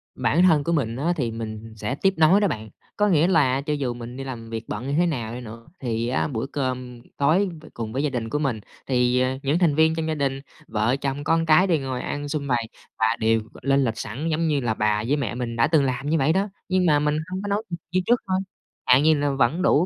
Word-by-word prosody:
Bản 130 Hz, +8 st, +2 dB
thân 160 Hz, -5 st, +5 dB
của 170 Hz, -, -1 dB
mình 130 Hz, -8 st, 0 dB
á, 155 Hz, +7 st, 0 dB
thì 125 Hz, -8 st, -1 dB
mình 110 Hz, 0 st, -7 dB
sẽ 110 Hz, +4 st, -3 dB
tiếp 195 Hz, +6 st, +2 dB
nối 165 Hz, +6 st, +5 dB
đó 205 Hz, -, +3 dB
bạn. 110 Hz, -, -4 dB, 0.3 s
Có 210 Hz, -, +3 dB
nghĩa 170 Hz, -4 st, +4 dB
là 140 Hz, -7 st, +3 dB
cho 150 Hz, +2 st, -2 dB
dù 135 Hz, -4 st, -1 dB
mình 120 Hz, +1 st, -8 dB
đi 135 Hz, -, -5 dB
làm 120 Hz, -4 st, -7 dB
việc 115 Hz, -1 st, -4 dB
bận 115 Hz, +5 st, -5 dB
như 140 Hz, -, -1 dB
thế 175 Hz, -, +4 dB
nào 120 Hz, -9 st, -2 dB
đi 125 Hz, -, -6 dB
nữa, 115 Hz, 0 st, -10 dB
thì 115 Hz, -3 st, -2 dB
á 125 Hz, -, 0 dB
bữa 125 Hz, -4 st, -3 dB
cơm 130 Hz, -3 st, -4 dB, 0.2 s
tối 165 Hz, +8 st, +3 dB
t -, -, -14 dB
cùng 110 Hz, -2 st, -5 dB
với 135 Hz, +3 st, -1 dB
gia 150 Hz, -, +1 dB
đình 120 Hz, -4 st, -3 dB
của 150 Hz, -, -1 dB
mình, 135 Hz, -7 st, -1 dB, 0.3 s
thì, 125 Hz, -1 st, +2 dB
à, 130 Hz, +1 st, 0 dB
những 145 Hz, +5 st, +1 dB
thành 165 Hz, -5 st, +3 dB
viên 160 Hz, +1 st, +4 dB
trong 160 Hz, -1 st, -2 dB
gia 160 Hz, -, -1 dB
đình, 135 Hz, -2 st, -1 dB, 0.3 s
vợ, 110 Hz, +4 st, +1 dB
chồng, 140 Hz, +1 st, -2 dB
con 165 Hz, +2 st, +2 dB
cái 165 Hz, +4 st, +5 dB
đều 165 Hz, -5 st, +2 dB
ngồi 130 Hz, -2 st, -3 dB
ăn 145 Hz, 0 st, -4 dB
sum 140 Hz, -1 st, -3 dB
vầy 120 Hz, -3 st, 0 dB, 0.3 s
và 110 Hz, +1 st, +3 dB
đều 110 Hz, 0 st, +2 dB, 0.2 s
lên 135 Hz, +1 st, +2 dB
lịch 115 Hz, -2 st, -2 dB
sẵn 125 Hz, +8 st, -4 dB
giống 165 Hz, +1 st, +1 dB
như 150 Hz, -2 st, +1 dB
là 115 Hz, -3 st, 0 dB
bà 105 Hz, 0 st, +1 dB
với 140 Hz, -, +2 dB
mẹ 120 Hz, -6 st, -2 dB
mình 120 Hz, -2 st, -3 dB
đã 115 Hz, 0 st, +3 dB
từng 155 Hz, -2 st, +3 dB
làm 135 Hz, +2 st, -2 dB
như 165 Hz, -, +2 dB
vậy 150 Hz, +2 st, +2 dB
đó. 195 Hz, +3 st, 0 dB, 0.2 s
Nhưng 185 Hz, -1 st, +2 dB
mà 150 Hz, -3 st, +4 dB
mình 150 Hz, 0 st, +1 dB
hông 185 Hz, +1 st, -3 dB
có 205 Hz, -, -5 dB
nấu 205 Hz, +1 st, 0 dB
được 170 Hz, -, -4 dB
như 185 Hz, +1 st, +2 dB
trước 240 Hz, 0 st, +3 dB
thôi, 185 Hz, 0 st, +1 dB, 0.5 s
chẳng 125 Hz, -, +6 dB
hạn 135 Hz, -, +3 dB
như 160 Hz, +1 st, +5 dB
là 145 Hz, -1 st, 0 dB
vẫn 135 Hz, +5 st, +1 dB
đủ 175 Hz, -3 st, +4 dB
135 Hz, 270 wpm, -24 LUFS, 120-160 Hz, 0.5 s, chẳng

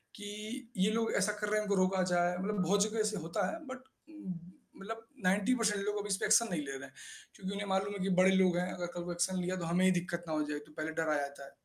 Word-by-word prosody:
कि 215 Hz, +4 st, -7 dB
ये 195 Hz, +3 st, +3 dB
लोग 225 Hz, +1 st, +1 dB
ऐसा 200 Hz, +1 st, +3 dB
कर 210 Hz, -, 0 dB
रहे 215 Hz, -, +2 dB
हैं, 210 Hz, -, -2 dB
इनको 200 Hz, -, +2 dB
रोका 185 Hz, 0 st, +2 dB
जाए, 175 Hz, 0 st, +3 dB
मतलब 200 Hz, +2 st, -1 dB
बहुत 200 Hz, +4 st, +4 dB
जगह 220 Hz, +1 st, -2 dB
ऐसे 215 Hz, -1 st, +1 dB
होता 165 Hz, 0 st, -1 dB
है 330 Hz, -, -5 dB
बट 260 Hz, 0 st, -7 dB, 0.3 s
म 190 Hz, -, -7 dB, 0.4 s
मतलब 225 Hz, +3 st, -7 dB, 0.2 s
90% 210 Hz, +2 st, +2 dB
लोग 210 Hz, 0 st, 0 dB
अभी 205 Hz, -, -4 dB
इस 195 Hz, -, +3 dB
पे -, -, -1 dB
एक्शन 215 Hz, +2 st, +5 dB
नहीं 165 Hz, -4 st, 0 dB
ले 135 Hz, -2 st, -5 dB
रहे 135 Hz, 0 st, -6 dB
हैं। 135 Hz, -, -16 dB, 0.4 s
क्योंकि 190 Hz, 0 st, -5 dB
उन्हें 200 Hz, 0 st, -3 dB
मालूम 195 Hz, +1 st, 0 dB
है 200 Hz, -, -5 dB
कि 195 Hz, -, 0 dB
बड़े 185 Hz, +1 st, +6 dB
लोग 185 Hz, -2 st, +4 dB
हैं, 180 Hz, +1 st, 0 dB
अगर 175 Hz, -, -3 dB
कल 175 Hz, -, -3 dB
को 175 Hz, -, -4 dB
एक्शन 175 Hz, +2 st, 0 dB
लिया 180 Hz, +1 st, -1 dB
तो 175 Hz, -, -3 dB
हमें 175 Hz, +3 st, +2 dB
ही 185 Hz, -, +6 dB
दिक्कत 175 Hz, -1 st, -1 dB
ना 160 Hz, -, -2 dB
हो 155 Hz, -, +1 dB
जाए, 145 Hz, -, -2 dB
तो 150 Hz, +1 st, -16 dB
पहले 155 Hz, +1 st, -2 dB
डर 160 Hz, -1 st, +1 dB
आ 155 Hz, -, +3 dB
जाता 140 Hz, 0 st, -4 dB
है। 140 Hz, -, -11 dB
190 Hz, 285 wpm, -33 LUFS, 175-210 Hz, 0.4 s, बड़े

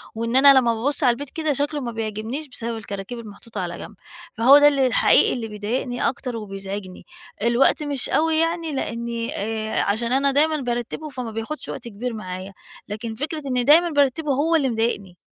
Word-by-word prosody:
وإن 230 Hz, +2 st, -2 dB
أنا 275 Hz, +1 st, +8 dB
لمّا 235 Hz, -2 st, +2 dB
بابُصّ 275 Hz, +7 st, -1 dB
على 245 Hz, -2 st, +5 dB
البيت 285 Hz, +3 st, -7 dB
كده 310 Hz, -1 st, -1 dB
شكله 290 Hz, +2 st, -1 dB
ما 240 Hz, -, -4 dB
بيعجبنيش، 225 Hz, +6 st, -4 dB
بسبب 230 Hz, -2 st, -5 dB
الكراكيب 205 Hz, +2 st, -6 dB
المحطوطة 210 Hz, -1 st, -8 dB
على 175 Hz, -1 st, -4 dB
جنب، 215 Hz, -, -10 dB, 0.4 s
فهو 260 Hz, +5 st, +8 dB
ده 290 Hz, 0 st, +7 dB
اللي 275 Hz, -3 st, +3 dB
الحقيقي 245 Hz, -, +4 dB
اللي 235 Hz, -3 st, -4 dB
بيضايقني 225 Hz, +4 st, -2 dB
أكتر 250 Hz, -1 st, -5 dB
وبيزعجني، 195 Hz, -2 st, -7 dB, 0.4 s
الوقت 235 Hz, +6 st, +3 dB
مش 285 Hz, -3 st, -1 dB
أوي 320 Hz, 0 st, +2 dB
يعني 330 Hz, 0 st, 0 dB
لأني 235 Hz, -2 st, -3 dB
آآ، 220 Hz, +1 st, -2 dB
عشان 230 Hz, +4 st, 0 dB
أنا 275 Hz, +1 st, +3 dB
دايمًا 310 Hz, +3 st, +2 dB
بارتبه 240 Hz, +5 st, -3 dB
فما 250 Hz, -5 st, -5 dB
بياخدش 225 Hz, +8 st, -5 dB
وقت 240 Hz, -, -6 dB
كبير 235 Hz, +3 st, -5 dB
معايا، 185 Hz, -2 st, -7 dB, 0.4 s
لكن 220 Hz, +2 st, -5 dB
فكرة 300 Hz, +5 st, -3 dB
إن 250 Hz, -2 st, 0 dB
دايمًا 330 Hz, +5 st, +6 dB
بارتبه 290 Hz, 0 st, +1 dB
هو 315 Hz, +5 st, +2 dB
اللي 275 Hz, -4 st, +2 dB
مضايقني. 220 Hz, -6 st, -2 dB
240 Hz, 180 wpm, -23 LUFS, 220-285 Hz, 0.4 s, أنا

